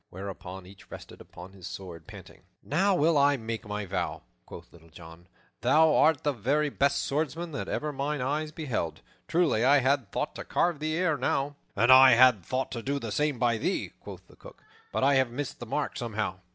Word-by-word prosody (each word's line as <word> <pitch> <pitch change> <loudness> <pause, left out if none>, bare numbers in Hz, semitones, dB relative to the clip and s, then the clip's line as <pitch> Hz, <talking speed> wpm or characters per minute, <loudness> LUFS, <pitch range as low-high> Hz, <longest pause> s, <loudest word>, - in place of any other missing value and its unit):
whereupon 95 -1 -8
each 95 +1 -16
rested - - -11
upon 90 +2 -12
his 95 -2 -10
sword, 85 -4 -9
panting. - - -13 0.2
"Now 190 +6 +1
will 160 -2 +3
I 140 0 +4
make 115 -2 -6
my 105 0 -4
vow," 90 -2 -3 0.2
quoth - - -12
Little 85 -1 -18
John, 80 +1 -14 0.3
"thou 160 0 +4
art 160 -1 +3
the 145 - +1
very 140 +6 0
best 140 0 +1
swordsman 160 +4 -2
that 140 - -5
ever 150 0 -3
mine 145 +2 -2
eyes 150 +4 -2
beheld. 130 - -4 0.3
Truly, 160 -10 +2
I 140 +3 +5
had 130 -5 0
thought - - -3
to - - -6
carve 170 -4 0
thee 155 +1 -2
ere 175 -4 +1
now." 140 +2 -1 0.2
"And 115 +5 +4
I 130 0 +9
had 120 -5 +5
thought 130 +8 -3
to 120 - -5
do 140 +4 -2
the 115 -6 -5
same 150 +2 0
by 120 -2 +1
thee," - - -2
quoth - - -11
the - - -20
Cook, - - -15 0.3
"but - - -1
I 140 +1 +4
have 130 -2 +3
missed 135 +3 -5
the 120 - -8
mark 150 +5 -2
somehow." 110 -6 -3
130 Hz, 205 wpm, -28 LUFS, 105-150 Hz, 0.3 s, I